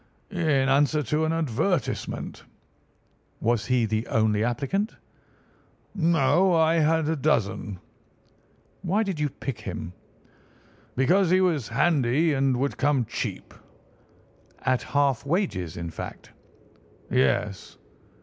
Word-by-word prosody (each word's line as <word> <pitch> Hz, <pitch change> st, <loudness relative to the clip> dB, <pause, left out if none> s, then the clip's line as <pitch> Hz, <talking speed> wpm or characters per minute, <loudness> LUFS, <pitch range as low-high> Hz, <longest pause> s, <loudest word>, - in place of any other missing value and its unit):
"In 155 Hz, -8 st, +1 dB
answer 145 Hz, +3 st, +3 dB
to 150 Hz, +5 st, 0 dB
an 160 Hz, -, 0 dB
advertisement." 160 Hz, -, -2 dB, 1.0 s
"Was 115 Hz, -1 st, 0 dB
he 125 Hz, -2 st, +2 dB
the 110 Hz, +1 st, -2 dB
only 110 Hz, -3 st, +1 dB
applicant?" 145 Hz, -, -1 dB, 1.0 s
"No, 170 Hz, +1 st, +3 dB
I 165 Hz, 0 st, +3 dB
had 160 Hz, 0 st, +2 dB
a 160 Hz, -, +1 dB
dozen." 110 Hz, -9 st, 0 dB, 1.0 s
"Why 195 Hz, +4 st, +1 dB
did 190 Hz, -7 st, -3 dB
you 150 Hz, -1 st, +1 dB
pick 135 Hz, -2 st, -6 dB
him?" 85 Hz, +3 st, -6 dB, 1.0 s
"Because 175 Hz, +8 st, +3 dB
he 185 Hz, +1 st, +4 dB
was 165 Hz, -, +1 dB
handy 145 Hz, +2 st, +2 dB
and 135 Hz, -2 st, +1 dB
would 140 Hz, +2 st, -1 dB
come 140 Hz, -3 st, +2 dB
cheap." -, -, -5 dB, 1.1 s
"At 130 Hz, -1 st, +1 dB
half 140 Hz, -3 st, +1 dB
wages, 140 Hz, -, -1 dB
in 85 Hz, -1 st, -5 dB
fact." -, -, -8 dB, 0.8 s
"Yes." 95 Hz, +10 st, 0 dB
145 Hz, 110 wpm, -26 LUFS, 120-165 Hz, 1.1 s, he